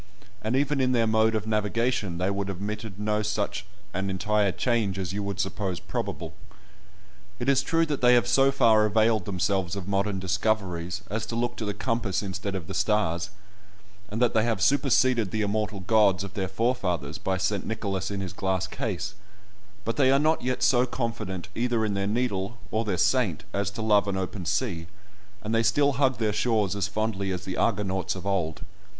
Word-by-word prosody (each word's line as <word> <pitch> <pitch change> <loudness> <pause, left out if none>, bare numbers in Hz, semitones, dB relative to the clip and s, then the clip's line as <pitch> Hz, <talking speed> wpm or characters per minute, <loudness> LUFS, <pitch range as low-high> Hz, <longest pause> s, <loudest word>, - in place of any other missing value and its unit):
And 110 +4 -1
even 140 0 +1
in 130 0 +2
their 115 -2 +3
mode 110 0 +3
of 110 -1 -1
navigation 110 -3 0
they 90 - -1
have 100 0 -1
admitted 100 +1 -5
no 105 +1 0
such 105 -2 -2 0.3
an 95 +2 -2
entire 100 +1 +1
change 105 -1 0
as 95 -1 -3
you 105 - -2
would 100 -1 -4
suppose 95 -2 -2
probable. 80 -1 -4 1.0
It 120 - -4
is 135 -1 +4
true 165 +4 +2
that 150 -3 -3
they 125 0 +6
have 120 - +3
so 135 +3 +4
far 115 -5 +5
availed 110 -1 +2
themselves 95 -1 0
of 100 -2 -6
modern 100 0 0
discoveries 95 -2 -1
as 110 +1 -2
to 115 - -4
look 120 +1 -1
to 110 - -3
the 105 -1 -2
compass 110 -4 -1
instead 100 0 -4
of 90 -4 -4
the 95 - -6
stars, 95 -4 +1 0.8
and 105 +2 -3
that 125 -1 +3
they 110 - +3
have 115 -3 0
superseded 130 -1 +3
the 110 +3 -1
immortal 105 -1 -1
gods 100 -1 +3
of 100 - -7
their 95 -3 -2
forefathers 95 - -1
by 95 -1 -1
St. 95 +2 0
Nicholas 100 -4 -3
in 100 -1 -3
his 95 -3 -5
glass 95 -1 -1
case, 100 -3 -3 0.7
but 115 - -2
they 135 -2 +5
are 135 - +5
not 155 +3 +2
yet 130 0 -1
so 125 0 +4
confident 115 -7 -3
either 120 -2 0
in 105 - -1
their 100 0 -1
needle, 110 -1 -1
or 110 +1 +1
their 100 -5 -1
saint, 110 - +2
as 100 -1 0
to 105 +3 -5
love 105 -2 +4
an 100 -1 -1
open 95 -1 -4
sea, 100 -6 -1 0.6
and 110 +1 -2
they 115 - +4
still 140 +6 +3
hug 130 -2 +2
their 110 -2 0
shores 105 -2 +1
as 100 -1 0
fondly 100 -2 -2
as 90 -1 -4
the 95 - -4
Argonauts 95 -5 0
of 95 - -8
old. 95 -3 -1
105 Hz, 195 wpm, -27 LUFS, 95-115 Hz, 1.0 s, they